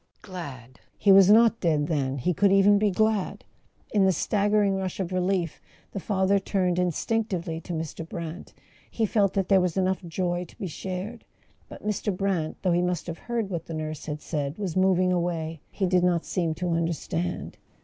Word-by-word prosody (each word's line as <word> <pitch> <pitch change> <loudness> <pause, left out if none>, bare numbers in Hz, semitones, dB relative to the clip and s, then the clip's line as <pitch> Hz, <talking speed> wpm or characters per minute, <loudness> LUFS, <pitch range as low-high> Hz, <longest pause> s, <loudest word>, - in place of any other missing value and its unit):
Glad! 135 - -9 0.2
He 200 - +4
was 195 0 +8
not 230 +1 +6
dead, 155 -4 +1
then; 140 -4 -1
he 160 +8 0
could 200 +4 +3
even 200 +1 +5
be 210 0 +3
glad! 215 0 0 0.5
In 205 -2 +3
the 190 - +5
staggering 205 +1 +2
rush 190 -1 -3
of 185 -2 -2
relief 180 -2 -1 0.3
the 200 - -4
father 195 0 +1
turned 185 -3 0
in¬ 180 0 +2
stinctively 180 -3 -2
to 175 - -6
Mr. 160 0 -5
Brant; 170 0 -6 0.4
he 225 - 0
felt 200 -2 +2
that 195 -2 0
there 195 -2 +5
was 180 -1 -1
enough 190 0 +1
joy 175 +1 -2
to - - -19
be - - -5
shared. 190 +6 -5 0.5
But - - -11
Mr. 210 -2 -1
Brant, 185 -5 -1
though 185 - +2
he 175 - +2
must 180 0 -1
have 170 -1 -6
heard 230 -4 -3
what 170 -3 -4
the 165 - -5
nurse 155 -1 -5
had 150 0 -4
said, 145 -1 -3
was 195 -6 -3
moving 185 -1 +3
away; 165 -3 -2
he 195 - -1
did 180 -1 +2
not 175 -2 +2
seem 165 -3 -1
to 180 +2 -2
understand. 170 +1 -2
180 Hz, 190 wpm, -26 LUFS, 165-195 Hz, 0.5 s, was